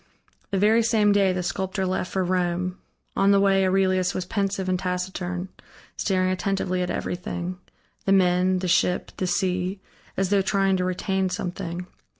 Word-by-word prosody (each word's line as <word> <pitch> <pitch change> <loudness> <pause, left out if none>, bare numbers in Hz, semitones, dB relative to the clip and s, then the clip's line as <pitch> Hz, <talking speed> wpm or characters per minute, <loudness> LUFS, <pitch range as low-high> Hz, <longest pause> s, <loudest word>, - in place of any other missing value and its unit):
The 195 - -1
very 215 +4 +4
same 220 -2 +3
day 200 -2 +4
the 180 -1 -2
sculptor 190 +2 -2
left 185 0 -2
for 190 - 0
Rome. 180 0 -1 0.4
On 195 0 +3
the 200 0 +5
way 195 -1 +4
Aurelius 185 -1 +2
was 185 - -2
pensive 195 -1 -1
and 185 -1 +1
taciturn, 180 0 -3 0.5
staring 185 -2 +1
attentively 185 -1 -1
at 180 - -1
everything 180 0 -4 0.5
the 195 - +2
men, 185 -1 +3
the 185 0 -2
ship, 180 +1 +1
the 185 - -1
sea, 185 +1 0 0.4
as 195 0 0
though 200 -1 +4
trying 195 0 +2
to 180 - 0
retain 190 +1 0
something. 180 -1 -4
185 Hz, 160 wpm, -25 LUFS, 180-195 Hz, 0.5 s, the